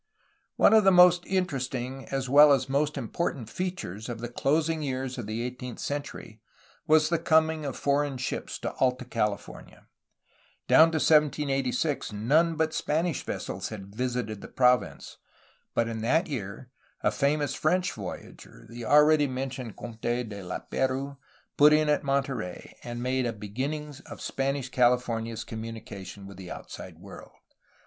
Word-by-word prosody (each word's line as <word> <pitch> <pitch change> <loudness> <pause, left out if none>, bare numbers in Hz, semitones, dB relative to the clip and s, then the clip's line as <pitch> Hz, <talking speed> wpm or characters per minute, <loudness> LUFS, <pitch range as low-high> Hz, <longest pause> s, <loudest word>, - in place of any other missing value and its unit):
One - - +5
of 220 -1 +7
the 195 - +6
most 180 -1 +6
interesting 135 -7 -2
as 135 -1 -2
well 145 +2 +8
as 130 -1 +1
most 145 +2 0
important 125 -2 -3
features 150 - -4
of 120 - -4
the 120 +1 -5
closing 155 +5 0
years 130 -2 -3
of 115 - -5
the 110 +2 -3
eighteenth 125 0 -6
century 140 -6 -6 0.5
was 155 0 +5
the 170 -1 +1
coming 160 -1 +2
of 135 - -4
foreign 140 -1 0
ships 125 - -4
to - - -3
Alta 125 -1 +1
California. 105 -4 -4 0.8
Down 160 +1 +7
to 165 - -4
1786 145 -3 +1
none 155 +11 +2
but 160 0 0
Spanish 160 0 0
vessels 90 -1 -5
had 100 -2 -9
visited 125 -3 -2
the - - -8
province, 125 -1 +1 0.6
but 115 - +2
in 115 -1 -4
that 160 +10 +2
year 125 - -6 0.3
a 105 - +2
famous 140 +6 0
French 180 +4 +1
voyager, 95 - -9
the 120 0 -7
already 150 +1 +5
men 130 0 -3
tioned 125 -4 -7
Comte 110 -1 -9
de 120 +1 0
Lap^rouse, 130 +7 -3 0.4
put 150 +1 +7
in 155 0 +3
at 150 - +2
Monterey, 135 -9 -2
and 120 0 -5
made 130 0 0
a 115 - -2
beginning 135 +9 -4
of - - -9
Spanish 135 -1 -2
California's 120 -3 +1
communication 110 -4 -8
with 100 -1 -11
the 95 -2 -9
outside - - -9
world. - - -12
130 Hz, 150 wpm, -27 LUFS, 115-150 Hz, 0.8 s, well